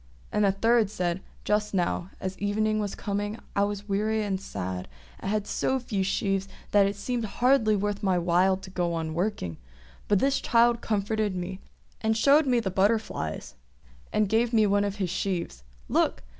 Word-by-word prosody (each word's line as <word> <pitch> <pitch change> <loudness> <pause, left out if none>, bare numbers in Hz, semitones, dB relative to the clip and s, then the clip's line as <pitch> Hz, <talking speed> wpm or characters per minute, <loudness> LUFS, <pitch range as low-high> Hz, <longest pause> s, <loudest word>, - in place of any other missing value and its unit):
And 210 -1 +3
a - - +4
third 225 +2 +3
said, 180 -3 -2 0.2
"Just 210 -1 0
now, 175 0 0
as 190 0 -4
evening 215 +1 +1
was 205 -2 -2
coming, 205 +1 -3 0.2
I 200 - +3
was 205 0 -5
weary 215 +2 0
and 195 -2 -2
sad, 95 - -5 0.3
and - - -4
had 210 0 0
so 265 - 0
few 230 -6 -2
sheaves 195 0 0 0.2
that 200 -1 +5
it 200 - -2
seemed 235 +3 -2
hardly 235 -1 +3
worth 205 0 -1
my 190 -3 +2
while 180 +2 +3
to 190 0 -11
go 175 -2 -1
on 160 -1 -3
working; 170 - -2 0.5
but 205 - +4
this 275 +7 +2
child 235 0 +3
comforted 210 -1 0
me, 185 +1 -4 0.4
and 220 0 +1
showed 285 +5 +5
me 245 -2 +3
the 200 -5 -2
butterflies, 195 - 0 0.6
and 215 -1 +2
gave 230 +3 +1
me 220 -1 +5
of 205 -1 +2
his 190 -4 -2
sheaves. 175 - -2 0.3
Look! - - +1
205 Hz, 175 wpm, -27 LUFS, 190-220 Hz, 0.6 s, that